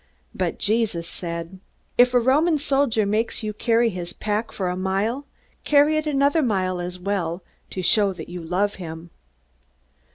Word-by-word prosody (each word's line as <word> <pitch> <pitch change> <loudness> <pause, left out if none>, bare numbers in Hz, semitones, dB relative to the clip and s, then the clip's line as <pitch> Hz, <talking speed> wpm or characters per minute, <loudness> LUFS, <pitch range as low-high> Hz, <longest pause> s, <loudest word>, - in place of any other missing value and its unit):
But - - -2
Jesus 210 -6 0
said, 170 +2 -5 0.4
"If 250 +1 +5
a - - +7
Roman 300 +7 +3
soldier 270 -6 +1
makes 215 +3 -1
you 215 0 -2
carry 230 +1 +2
his 175 -2 -5
pack 215 +2 -2
for 190 - -3
a 180 - -1
mile, 200 +9 -1 0.4
carry 295 +1 +4
it 310 0 -1
another 285 +2 +3
mile 185 -7 0
as 180 +1 -5
well, 180 -2 -2 0.3
to 185 - -4
show 200 +2 +4
that 165 -3 -9
you 175 0 -7
love 185 +5 0
him." 165 0 -8
205 Hz, 160 wpm, -23 LUFS, 180-245 Hz, 0.4 s, a